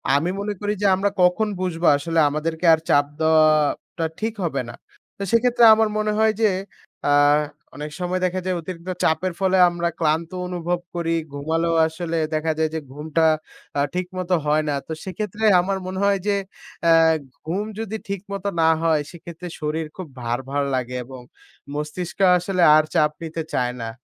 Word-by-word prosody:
আমি 155 +5 +1
মনে 205 +1 -2
করি 205 0 0
যে, 205 - +1
আমরা 200 +2 +1
কখন 180 +5 +3
বুঝবো 175 -2 -1
আসলে 165 +3 -1
আমাদেরকে 160 +3 -3
আর 160 - +3
চাপ 145 0 +4
দেওয়াটা 155 +1 +2
ঠিক 220 0 -2
হবে 140 -6 -1
না? - - -8 0.4
তো - - -10
সেক্ষেত্রে 240 +1 +3
আমার 220 0 +2
মনে 215 0 0
হয় 220 0 +4
যে, 215 - +5 0.6
আ 145 - +3 0.6
অনেক 150 +1 -6
সময় 180 +1 -1
দেখা 185 +1 -1
যায় 185 - 0
অতিরিক্ত 180 +1 -8
চাপের 170 +3 +1
ফলে 190 -1 +2
আমরা 175 0 -1
ক্লান্ত 160 +1 0 0.2
অনুভব 175 0 -2 0.2
করি। 165 -1 0 0.2
ঘুমালেও 165 +3 -1
আসলে 165 +1 -4 0.2
দেখা 155 +1 0
যায় 160 0 +1
যে, - - -1
ঘুমটা 155 +2 0 0.5
আ - - +2
ঠিকমতো 180 0 -2
হয় 150 +1 +2
না। 145 - 0
তো - - -8
সেক্ষেত্রে 210 +3 -5 0.2
আমার 195 +2 -2
মনে 190 +1 -4
হয় 200 -1 +3
যে, 205 - +3 0.5
অ্যা 165 - +5 0.5
ঘুম 195 +5 -1
যদি 220 0 -4
ঠিকমতো 200 0 -4
না 160 - +5
হয়, 160 -2 +2
সেক্ষেত্রে 170 0 -9
শরীর 155 +1 -2
খুব 185 - -6
ভার, 120 +1 -1
ভার 145 0 0
লাগে 125 0 -3
এবং 130 0 -10 0.5
মস্তিষ্ক 150 +5 -5 0.2
আসলে 180 +1 -1
আর 155 - +5
চাপ 150 -1 +4
নিতে 165 0 -4
চায় 125 0 0
না। 115 - -4
170 Hz, 170 wpm, -22 LUFS, 155-185 Hz, 0.6 s, যে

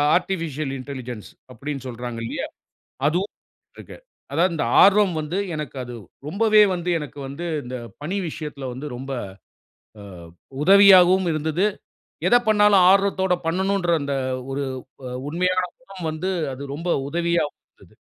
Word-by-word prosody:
Artificial 155 -6 -2
intelligence 125 -4 -7 0.2
அப்டின்னு 135 +2 -6
சொல்றாங்க 120 -1 -6
இல்லையா. - - -4 0.6
அதுவும் 180 +6 -1 0.4
இருக்கு. - - -11 0.4
அதாவது 170 +5 +2
இந்த 135 - 0 0.2
ஆர்வம் 200 -2 +5
வந்து 155 +5 -3 0.2
எனக்கு 150 -3 -5
அது 120 0 -8 0.3
ரொம்பவே 215 +6 +4
வந்து 175 0 -2
எனக்கு 145 -2 -8
வந்து 140 +6 -6 0.2
இந்த 125 +1 -5 0.3
பணி 175 +7 -3
விஷயத்துல 150 -3 -6
வந்து 130 +4 -7
ரொம்ப, 135 +2 -6 0.9
அ - - -10 0.6
உதவியாவும் 190 -1 +7
இருந்துது. 160 +4 0 0.6
எத - - +5
பண்ணாலும் 210 -3 +5
ஆர்வத்தோட 195 -1 +2
பண்ணனுன்ற 190 +1 0
அந்த 140 0 -2 0.4
ஒரு 140 +1 -2 0.5
அ - - -5 0.2
உண்மையான 180 +3 +1 0.2
குணம் 195 -9 -7
வந்து 165 +4 -3 0.2
அது 135 +2 -8
ரொம்ப 165 +4 -4 0.2
உதவியாவும் 170 -1 0 0.2
இருந்துது. - - -20
165 Hz, 130 wpm, -23 LUFS, 140-190 Hz, 0.9 s, உதவியாவும்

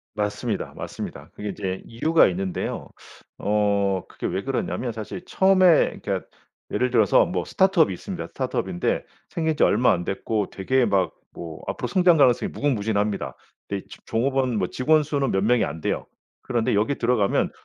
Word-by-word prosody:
맞습니다, 105 +1 -2
맞습니다. - - -7
그게 105 0 -5
인제 95 -2 -4
이유가 160 +8 +3
있는데요. 95 0 -3 0.5
어 100 -2 +1
그게 - - -8
왜 - - -1
그러냐면 120 -1 -2
사실 110 - -7
처음에 185 -3 +4
그러니까 - - -2 0.5
예를 125 +4 +1
들어서 110 -5 +4
뭐 180 - -2
스타트업이 185 - +3
있습니다. - - -6
스타트업인데 90 - -2 0.2
생긴지 160 -3 0
얼마 120 +4 +4
안 90 -1 -2
됐고 105 +2 -2
되게 125 +6 +1
막 100 -3 +1 0.2
뭐 80 -2 -8
앞으로 - - -3
성장 180 -3 +4
가능성이 130 -4 +4
무궁무진합니다. 105 -6 -1 0.3
근데 100 -1 -4
이제 - - -13
종업원 130 0 +1
뭐 90 -2 0
직원 155 +4 +3
수는 140 -3 -1
몇 95 -1 +1
명이 120 +2 +3
안 80 - -6
돼요. - - -2 0.3
그런데 120 -4 0
여기에 110 +7 +1
들어가면 115 -4 +1
115 Hz, 385 characters per minute, -24 LUFS, 100-140 Hz, 0.5 s, 처음에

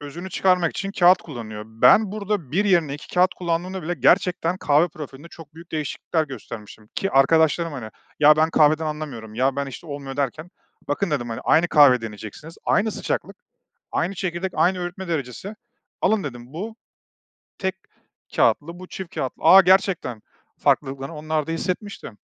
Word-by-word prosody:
özünü 165 +6 -8
çıkarmak 180 -2 +2
için 195 - -4
kâğıt 180 -1 +5
kullanılıyor. 110 -7 -8
Ben 190 - +4
burada 205 -8 -3
1 195 +6 +2
yerine 170 -8 +2
2 150 - -11
kâğıt 180 +1 +3
kullandığımda 180 +2 -3
bile 175 +3 -2
gerçekten 175 +4 +2
kahve 155 0 +3
profilinde 150 -1 -10
çok 160 -3 -14
büyük 165 +1 -14
değişiklikler 155 +1 -2
göstermiştim 110 -5 -10
ki 195 - -1
arkadaşlarım, 160 +4 +3
hani, 120 -6 -7 0.3
"Ya, 150 +1 +7
ben 160 +1 +3
kahveden 155 0 +3
anlamıyorum. 140 -8 -6
Ya, 130 +3 +1
ben, 140 0 -1
işte, 135 +5 -9
olmuyor." 140 -2 -7
derken, 145 +5 -3 0.4
"Bakın." 165 +6 -1
dedim, 130 -5 -1
hani, 115 - -5
"Aynı 170 +2 +4
kahveyi 140 -6 +6
deneyeceksiniz. 110 +8 -9
Aynı 215 +2 +2
sıcaklık, - - -3 0.6
aynı 175 +4 -1
çekirdek, 180 0 -3
aynı 185 +1 +2
öğütme 180 +1 -6
derecesi. 160 - -4 0.5
Alın." 200 -1 +2
dedim, 120 -2 -8
"Bu 215 +8 -6 0.8
tek 190 -1 -1 0.6
kâğıtlı, 150 +9 +2
bu 185 - -10
çift 190 -3 -8
kâğıtlı." 130 - -4
"Aaa, 190 - +9
gerçekten." 185 - +2 0.4
Farklılıklarını 135 +2 0
onlar 155 0 -2
da 165 - -3
hissetmişti. 185 +5 -4
160 Hz, 160 wpm, -23 LUFS, 135-180 Hz, 0.8 s, Aaa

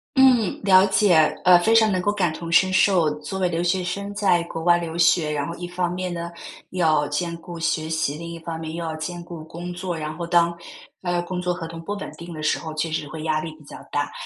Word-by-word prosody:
嗯， 255 -6 +4
了 190 0 +7
解， 190 -2 +4 0.3
呃， 180 -1 +8
非 220 +6 +2
常 220 -1 +6
能 185 -2 0
够 205 - +1
感 180 -6 0
同 170 0 -6
身 185 +2 +5
受。 185 -4 +4
作 190 +6 -5
为 185 - +2
留 170 0 -1
学 180 +1 +1
生 200 +3 -4
在 190 -4 +2
国 165 -1 -6
外 175 0 +5
留 170 -1 -5
学， 170 -2 +3
然 145 -1 -2
后 170 - -5
一 175 - -6
方 180 -1 -1
面 180 -1 -3
呢， 170 0 -4 0.4
要 155 -5 +2
兼 170 +3 -2
顾 170 0 -9
学 165 -1 -1
习， 160 -2 -1
另 170 +1 -7
一 170 - -7
方 165 0 -6
面 160 0 -6
又 170 - -4
要 160 -1 -3
兼 170 +2 -5
顾 170 -2 -9
工 175 +2 -7
作。 175 -1 -4
然 155 0 -4
后 170 +1 -5
当， 170 0 +3 0.5
呃， 175 -1 0
工 180 0 -4
作 180 0 0
合 170 -2 -6
同 165 0 -8
不 205 +5 -4
稳 205 - -6
定 170 0 -9
的 155 -1 -7
时 - - +1
候， 160 -1 -7
确 155 +1 -2
实 150 -2 -2
会 155 +1 -7
压 155 -1 +1
力 155 0 -6
比 150 - -17
较 - - -11
大。 145 0 -1
170 Hz, 275 characters per minute, -23 LUFS, 160-180 Hz, 0.5 s, 呃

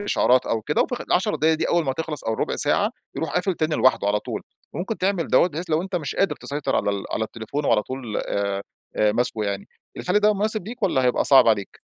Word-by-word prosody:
إشعارات 130 -10 +2
أو 110 -1 -1
كده، 150 - +1
وفي - - -3
خ - - -9
ال10 180 - +1
دقايق 160 +2 +3
دي 155 - -1
أول 170 -2 +2
ما 135 - 0
هتخلص 155 0 -5
أو 110 - 0
الربع - - -2
ساعة - - +2 0.3
يروح - - -2
قافل 185 +1 +1
تاني 155 -1 -1
لوحده 130 -5 +3
على 105 +1 +1
طول، - - -5 0.3
وممكن 190 +7 -3
تعمل 185 -3 0
دوّة 180 - +4
بحيث 165 +2 -6
لو 155 +2 +2
أنت 190 -1 -3
مش 150 -5 -4
قادر 175 -7 +1
تسيطر 145 0 -2
على - - +1
ال 100 -1 -3
على 110 - -1
التليفون 115 +7 -5
وعلى 105 - +3
طول 125 -3 -5
آآ 100 -1 -2 0.3
آآ 105 -1 +3
ماسكه 115 -2 -1
يعني، 100 -1 -3 0.3
الحل 180 +3 +1
ده 210 0 +4
مناسب 215 -1 0
ليك 240 0 -9
والّا 140 -10 +2
هيبقى 125 - +2
صعب 135 -4 +7
عليك؟ 100 -3 0
145 Hz, 235 wpm, -23 LUFS, 110-180 Hz, 0.3 s, صعب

